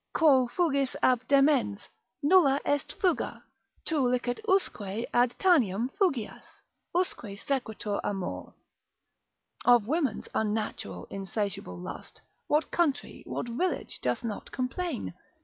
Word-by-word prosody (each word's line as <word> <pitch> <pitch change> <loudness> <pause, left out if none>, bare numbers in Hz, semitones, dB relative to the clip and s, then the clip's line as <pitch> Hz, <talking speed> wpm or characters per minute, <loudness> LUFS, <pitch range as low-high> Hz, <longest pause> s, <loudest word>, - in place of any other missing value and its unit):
Quo 270 -6 +5
fugis 280 -2 +1
ab 255 -1 +4
demens, 275 -7 +3 0.4
nulla 290 -4 +5
est 285 0 0
fuga, 360 -3 0 0.4
tu 320 -3 +1
licet 245 -1 +1
usque 230 - +1
Ad 245 0 +3
Tanaim 250 - +3
fugias, 275 - -2 0.3
usque 230 - -1
sequetur 220 -6 -2
amor. 195 -3 -4 1.1
Of 240 -4 +6
women's 295 +3 -1
unnatural, 210 - -2
insatiable 195 - -3
lust, 90 - -8 0.3
what 300 +2 +1
country, 320 -6 0
what - - -3
village 280 +8 -2
doth 125 - -1
not 220 -3 -5
complain? 260 - -3
250 Hz, 110 wpm, -29 LUFS, 210-295 Hz, 1.1 s, Of